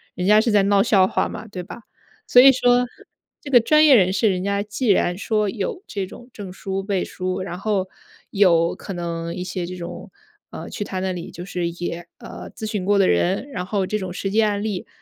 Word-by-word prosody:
人 180 - -3
家 210 +2 +6
是 225 +1 +1
在 205 -2 +4
闹 200 0 +3
笑 200 -5 +4
话 - - 0
嘛， 220 +1 -8
对 185 -3 -7
吧？” 235 - -10 0.5
所 245 - +7
以 270 +1 +9
说， 245 -1 +3 0.6
这 285 - -8
个 245 - +8
专 305 +7 +4
业 280 - +7
人 185 -5 +4
士， 205 +3 +2
人 180 -1 -2
家 200 0 -1
既 210 +4 -4
然 180 -3 +2
说 210 0 0
有 410 - -4
这 195 -2 -4
种 240 +5 -13
证 200 -3 -8
书 195 0 -4
背 195 -1 -1
书， 185 0 -4
然 185 -1 -6
后 200 -3 -1 0.4
有 170 -4 +3
可 195 - -8
能 170 -1 -4
一 180 - -4
些 180 -1 -4
这 180 - -6
种， 175 +2 -8 0.4
呃， - - -8
去 205 - -4
他 190 -2 -5
那 190 0 -1
里 175 -2 -6
就 175 - -9
是 180 -2 -2
也， 175 0 -6
呃， 235 - -10
咨 220 - -6
询 210 -3 -3
过 205 +1 +2
的 195 - +4
人， 190 - +1
然 180 -8 -4
后 195 -1 0
这 215 +2 -2
种 185 -1 -5
实 195 +2 -4
际 220 +2 +3
案 205 -1 0
例， 205 -4 -4
195 Hz, 250 characters per minute, -22 LUFS, 180-215 Hz, 0.6 s, 以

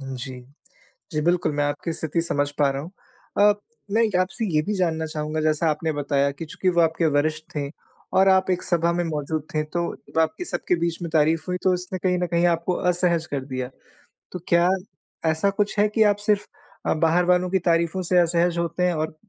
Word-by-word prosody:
जी, 130 -1 -6 0.7
जी, 150 - -1
बिल्कुल, 175 +1 +1
मैं 145 - 0
आपकी 145 +3 -2
स्थिति 160 +2 -1
समझ 145 -3 0
पा 145 -1 +4
रहा 135 +1 -4
हूँ। 170 +5 -9 0.5
अ, 205 0 +6 0.4
मैं 230 +2 +3 0.2
आपसे 190 +5 -1
ये 155 - +4
भी 210 +7 -2
जानना 165 -4 0
चाहूँगा, 155 0 -3
जैसा 155 +1 +2
आपने 155 +1 -1
बताया 140 -1 +1
कि 140 +4 -7
चूँकि 185 +4 -1
वो 170 - +5
आपके 165 +1 +2
वरिष्ठ 155 +1 0
थे 140 -1 -2 0.5
और 190 - +6
आप 190 0 +3
एक 180 - 0
सभा 170 -1 +1
में 175 0 0
मौजूद 155 -1 -2
थे 155 - +1
तो 170 +3 -2 0.3
आपकी 210 - -1
सब - - -3
के 180 - +4
बीच 170 +1 -2
में 170 - -3
तारीफ़ 160 +1 +3
हुई 180 - -1
तो 185 - +4
उसने 180 +1 -4
कहीं 180 0 +1
न 180 - 0
कहीं 170 0 +1
आपको 170 +1 +1 0.2
असहज 170 -2 +1
कर 135 -2 -2
दिया। 130 -2 -4 0.6
तो 180 - -5
क्या 170 +1 +4 0.6
ऐसा 160 +5 +2
कुछ 205 +1 -1
है 210 - +5
कि 220 +1 +3
आप 205 -1 +3
सिर्फ़ 210 -1 +2 0.4
अ, - - +2
बाहर 165 +2 +2
वालों 180 0 +3
की 190 - +2
तारीफ़ों 170 +1 +2
से 180 +1 +1
असहज 170 0 +2
होते 170 +1 -1
हैं 180 -1 +3
और 155 0 -3
170 Hz, 210 wpm, -24 LUFS, 155-180 Hz, 0.7 s, अ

